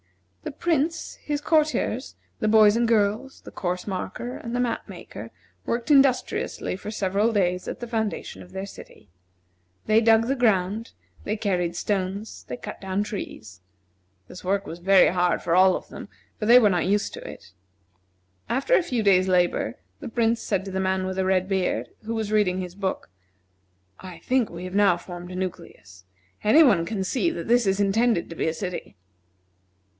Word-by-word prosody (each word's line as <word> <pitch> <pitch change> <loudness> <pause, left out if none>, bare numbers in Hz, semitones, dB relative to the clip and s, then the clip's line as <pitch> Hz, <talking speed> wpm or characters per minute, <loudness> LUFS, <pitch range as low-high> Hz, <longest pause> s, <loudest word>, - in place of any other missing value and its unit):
The - - -4 0.2
Prince, 325 0 0
his 295 -1 -2
courtiers, 310 -1 0 0.2
the 215 - 0
boys 215 -1 +6
and 235 0 +2
girls, 225 +4 0
the - - -11
course 180 0 -3
marker, 200 +5 -5
and 235 +1 -6
the - - 0
map 240 -3 -2
maker 115 - -9 0.4
worked 235 +4 -1
industriously 270 -8 +2
for 205 +2 -8
several 205 +1 0
days 180 -4 0
at - - -5
the 240 - -6
foundation 220 -3 -3
of 180 - -14
their 190 +1 -5
city. 145 - -13 0.8
They 220 +1 +4
dug 225 0 +4
the 270 +3 0
ground, 215 -2 +1 0.3
they 210 +2 -2
carried 180 -5 -1
stones, 195 +3 -3
they 125 - -5
cut - - -8
down 195 +1 -1
trees. 110 - -7 0.7
This 180 - -11
work 195 +2 0
was 165 - -8
very 190 +1 +5
hard 180 0 +1
for 170 0 +1
all 185 0 +6
of - - -7
them, - - -9 0.3
for 210 - -2
they 240 +2 +9
were 220 -4 +6
not 180 -2 0
used 205 +1 0
to - - -8
it. 90 - -11 1.0
After 270 - 0
a - - +6
few 245 -9 -1
days' 190 -2 +4
labor, 175 -10 +1 0.2
the - - -7
Prince 230 0 +1
said 195 -2 -1
to 195 - -6
the 190 - -2
man 190 0 0
with 190 0 -4
the 190 - +1
red 185 -1 +1
beard, 180 - -1 0.2
who 230 +1 -3
was 220 -2 -3
reading 200 -4 +2
his 180 -1 -5
book: 190 - -4 0.9
"I 185 -2 -9
think 255 +5 +1
we 170 +1 -8
have 185 +1 -6
now 200 -4 +4
formed 175 0 -9
a - - -7
nucleus. 100 - -7 0.4
Any 295 +10 +7
one 195 - +4
can 195 -1 -2
see 265 - 0
that 335 - -5
this 240 -2 +3
is 195 +1 +1
intended 205 0 +2
to - - -6
be - - -1
a 160 - 0
city." 180 - -6
200 Hz, 185 wpm, -25 LUFS, 185-230 Hz, 1.0 s, they